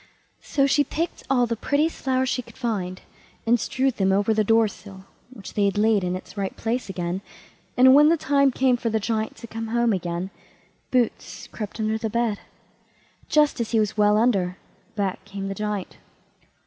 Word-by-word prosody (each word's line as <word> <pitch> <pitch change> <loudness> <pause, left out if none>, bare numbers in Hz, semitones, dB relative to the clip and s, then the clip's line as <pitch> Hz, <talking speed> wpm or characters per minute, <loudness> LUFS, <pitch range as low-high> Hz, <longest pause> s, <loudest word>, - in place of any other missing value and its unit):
So 275 - +1
she 285 +1 +3
picked 330 +5 -3
all 250 -2 +3
the 230 0 -2
prettiest 295 +7 0
flowers 260 -1 +1
she 250 - -1
could 235 - -17
find, 195 -7 -3 0.4
and 235 +1 +3
strewed 265 +1 -1
them 190 -1 +2
over 205 +3 +2
the 215 0 +2
door 225 +1 +4
sill, 195 -2 -12 0.2
which 235 -6 -11
they 205 - +2
had 200 +1 0
laid 210 -2 +3
in 180 0 -1
its 185 - -9
right 195 -2 -3
place 235 0 -2
again; 180 0 -3 0.6
and 260 +1 +8
when 295 +2 +7
the 335 - +3
time 280 -1 +3
came 255 -1 +2
for 235 - -2
the 220 0 0
Giant 220 +1 -2
to 235 - -10
come 225 0 -6
home 235 0 +2
again, 175 0 -3 0.6
Boots 245 -3 -1
crept 210 0 -6
under 220 0 0
the 220 - -2
bed. 230 -2 0 0.9
Just 300 -5 +3
as 230 - -3
he 225 - +4
was 215 -1 0
well 210 0 +4
under, 195 -6 +1 0.4
back 195 -3 -2
came 195 -1 -6
the - - -2
Giant. 210 -2 -4
220 Hz, 190 wpm, -24 LUFS, 200-250 Hz, 0.9 s, and